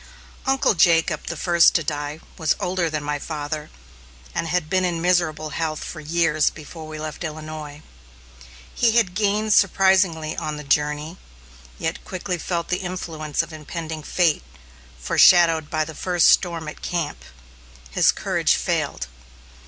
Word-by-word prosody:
" - - -23
Uncle 270 -3 +3
Jacob, 165 -2 +3
the 170 - -4
first 170 +1 +4
to 165 - +2
die, 145 +1 -4 0.2
was 160 -2 +1
older 180 -2 0
than 155 -1 -3
my 145 0 -2
father, 150 0 -5 0.6
and 165 - -2
had 180 -2 0
been 185 +3 +1
in 175 -2 0
miserable 165 -3 +1
health 155 0 -3
for 160 - -7
years 155 0 +2
before 155 +1 -10
we 155 0 -7
left 155 +2 -6
Illinois. 155 -1 -7 0.9
He 230 -2 +2
had 225 -6 +2
gained 210 +1 +1
surprisingly 190 -5 +3
on 155 -1 -4
the 150 - -7
journey, 150 +4 0 0.6
yet 165 +1 -3
quickly 185 -1 -4
felt 170 0 -3
the 180 - +1
influence 165 -4 -3
of 165 -1 -11
impending 155 +1 -6
fate, 165 0 +1 0.6
foreshadowed 165 - +5
by 155 -1 0
the 160 - -8
first 175 +2 +3
storm 170 -3 +2
at - - -8
camp. 170 -4 -3 0.7
His - - +4
courage - - +1
failed. - - -1
160 Hz, 150 wpm, -23 LUFS, 155-180 Hz, 0.9 s, foreshadowed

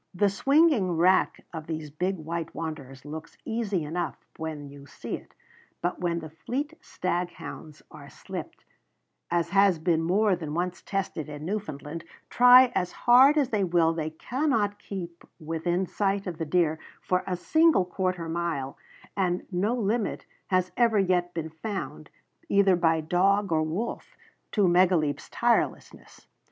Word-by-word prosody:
The 200 +3 +3
swinging 265 - +3
rack 185 +3 +3
of 160 -2 -7
these 155 -2 -5
big 180 +6 -1
white 165 +1 -5
wanderers 140 -5 -6
looks 155 +2 -8
easy 215 -7 -1
enough 170 +4 -3 0.2
when 155 -3 -5
you 140 0 -13
see - - -8
it; - - -13 0.4
but 175 +1 -2
when 170 -1 -1
the 155 - -8
fleet 270 - -4
staghounds 175 -4 -5
are - - -12
slipped, - - -8 0.6
as 170 -1 0
has 195 -2 +4
been 160 0 +1
more 195 +4 +2
than 160 -3 -6
once 175 +1 -2
tested 185 -6 -3
in 150 +1 -7
Newfoundland, 165 -5 -5 0.3
try 250 +1 +8
as 180 -1 -1
hard 260 +5 +6
as 280 -4 +2
they 210 -3 +1
will 170 -2 +3
they 160 -1 -3
cannot 220 - -1
keep 175 -4 -7 0.2
within 165 +3 -1
sight 200 +1 -1
of 175 -3 -5
the 160 - -1
deer 160 -1 +1 0.2
for 180 0 0
a 180 -2 -1
single 315 - +3
quarter 180 -2 -2
mile, 165 -5 -3 0.4
and 180 -2 0
no 200 +6 0
limit 225 -1 -1 0.2
has 185 -1 +1
ever 230 -3 +3
yet 180 -2 +2
been 160 -1 -4
found, 190 +5 -6 0.4
either 200 -2 +4
by 165 -2 +2
dog 195 +4 +2
or 160 -1 +3
wolf, 170 +10 -4 0.3
to 205 -4 +3
Megaleep's 175 -4 +2
tirelessness. - - -1
180 Hz, 150 wpm, -27 LUFS, 160-200 Hz, 0.6 s, try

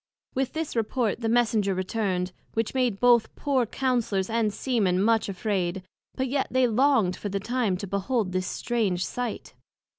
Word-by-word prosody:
With 265 0 -1
this 320 -4 -3
report 230 0 0
the 225 - 0
Messenger 220 -4 +2
returned; 185 -1 -1 0.2
which 225 -1 -1
made 250 -6 +1
both 240 -2 +5
the - - -20
poor 265 -5 +1
Councellors 230 -6 0
and 225 -2 +1
Sea 245 +3 -1
men 185 -3 +2
much 225 +1 +2
afraid; 190 -2 -2 0.3
but 260 0 -1
yet 270 +2 0
they 255 0 +3
longed 235 -5 +3
for 205 - -5
the 200 0 -2
time 220 -3 0
to 200 - -5
behold 200 +2 -1
this 185 0 -1
strange 200 -7 -1
sight. 245 -3 -4
225 Hz, 175 wpm, -26 LUFS, 195-245 Hz, 0.3 s, both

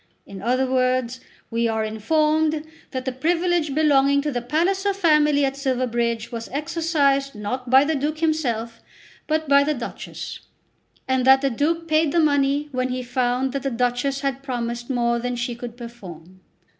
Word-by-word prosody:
In 195 -1 -10
other 250 +4 +1
words 255 -1 0 0.3
we 230 0 +1
are 220 -1 -1
informed 305 +7 +1 0.3
that 260 -1 -5
the 260 - -1
privilege 330 +2 0
belonging 280 -2 +4
to 295 - -1
the 245 -2 -2
Palliser 380 +10 0
family 300 -5 +3
at 270 0 -2
Silverbridge 240 -4 -1
was 230 -1 -6
exercised, 285 -2 0
not 245 +5 -4
by 265 +2 +7
the 315 +2 0
Duke 300 +2 -1
himself, 240 -8 -1 0.5
but 315 0 0
by 280 0 +5
the 300 +1 0
Duchess; 240 -2 -7 0.7
and 260 -1 +1
that 265 0 +7
the 275 -1 +1
Duke 330 +7 -1
paid 310 -1 +2
the 340 - +2
money 285 -1 +2
when 255 -1 -1
he 255 0 -3
found 250 +1 0
that 275 - -2
the 275 - -1
Duchess 250 +3 -1
had 275 -1 -2
promised 240 -2 -4
more 235 -2 +1
than 245 +1 -3
she 240 0 -3
could 240 0 -8
perform. 185 -7 -11
265 Hz, 170 wpm, -23 LUFS, 240-300 Hz, 0.7 s, by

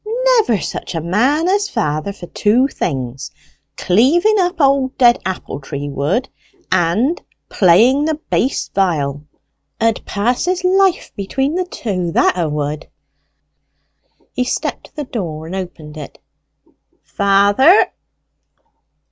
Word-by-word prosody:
"Never 235 - +1
such - - -5
a - - 0
man 250 - +1
as 405 +2 +1
father 155 +6 -2
for 195 -3 -10
two 220 +8 +2
things 130 - -4 0.5
cleaving 320 - +3
up 355 -1 0
old 275 -2 +2
dead 240 -2 +4
apple 185 -6 -5
tree 140 0 -6
wood 160 - -1 0.4
and 185 - +1 0.3
playing 230 - +4
the 315 0 0
bass 280 -3 -1
viol. 150 -7 -1 0.6
'A'd 225 -1 0
pass 235 +8 -1
his 365 0 -1
life 375 0 +2
between 270 +9 -2
the 365 +1 -1
two, 185 - -3
that - - +3
'a 170 -3 -1
would." 150 +1 -3 1.5
He 250 - 0
stepped 250 - -3
to - - -20
the 300 - -4
door 170 - -5
and 170 +4 -6
opened 165 -5 -7
it. 150 - -9 0.9
"Father!" 200 - +4
205 Hz, 125 wpm, -17 LUFS, 165-280 Hz, 1.5 s, dead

